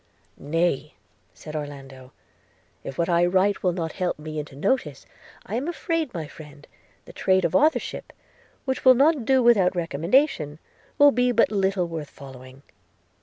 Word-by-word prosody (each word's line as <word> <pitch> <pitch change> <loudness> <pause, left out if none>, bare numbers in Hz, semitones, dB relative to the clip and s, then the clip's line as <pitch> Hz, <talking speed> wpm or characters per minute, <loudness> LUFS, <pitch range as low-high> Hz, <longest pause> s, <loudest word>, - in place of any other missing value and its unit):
'Nay,' 150 -1 -1 0.4
said 155 0 -11
Orlando, 135 -3 -8 0.7
'if 135 - -8
what 170 - 0
I 170 0 +2
write 190 +3 +2
will 180 - +1
not 165 -2 -4
help 180 -2 -2
me 155 0 -6
into 150 -2 -8
notice, 155 - -2 0.4
I 200 - -8
am 255 +7 -2
afraid, 330 -4 -2
my 165 -4 -5
friend, 150 -1 -13 0.4
the - - -13
trade 190 0 +1
of 160 - -1
authorship, 310 +2 +1 0.5
which 265 -1 -2
will 255 -1 +7
not 280 -1 +3
do 260 0 +3
without 200 -7 +4
recommendation, 165 - 0 0.4
will 290 -1 +7
be 250 -1 +1
but 230 -2 +2
little 190 -3 0
worth 160 -3 -6
following.' 130 0 -13
175 Hz, 155 wpm, -24 LUFS, 150-240 Hz, 0.7 s, will